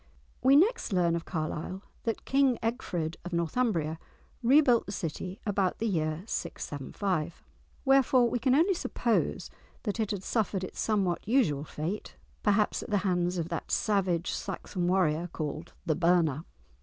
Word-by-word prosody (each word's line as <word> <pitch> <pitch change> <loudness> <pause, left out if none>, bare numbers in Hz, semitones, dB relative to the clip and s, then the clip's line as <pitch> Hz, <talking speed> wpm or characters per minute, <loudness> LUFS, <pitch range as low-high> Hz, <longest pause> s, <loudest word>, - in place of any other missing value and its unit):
We 270 +1 +6
next 415 - +3
learn 175 -3 +2
of 170 - -4
Carlisle 165 +3 -4 0.2
that 225 -2 -2
King 270 -3 +3
Egfrid 175 -9 -2
of 180 0 -7
Northumbria 170 -2 0 0.4
rebuilt 250 -1 +5
the - - -4
city 180 +1 -4
about 195 -3 +1
the 230 - -2
year 155 -4 -1
675, 155 - -3 0.4
wherefore 265 -2 +5
we 240 +1 -1
can 255 +2 +3
only 340 +7 +4
suppose 240 -9 -1 0.3
that 210 0 -2
it 215 -2 0
had 200 -3 -3
suffered 205 -4 0
its 185 - -7
somewhat 200 -4 0
usual 210 - +2
fate, 165 +8 -5 0.3
perhaps 210 0 +2
at - - -8
the 210 - +2
hands 180 -1 +1
of 170 -1 -2
that 170 - -4
savage 185 -5 +1
Saxon 185 -2 -3
warrior 175 -2 +2
called 155 +1 -5
The 160 - +2
Burner. 165 -3 +2
190 Hz, 150 wpm, -29 LUFS, 170-230 Hz, 0.4 s, We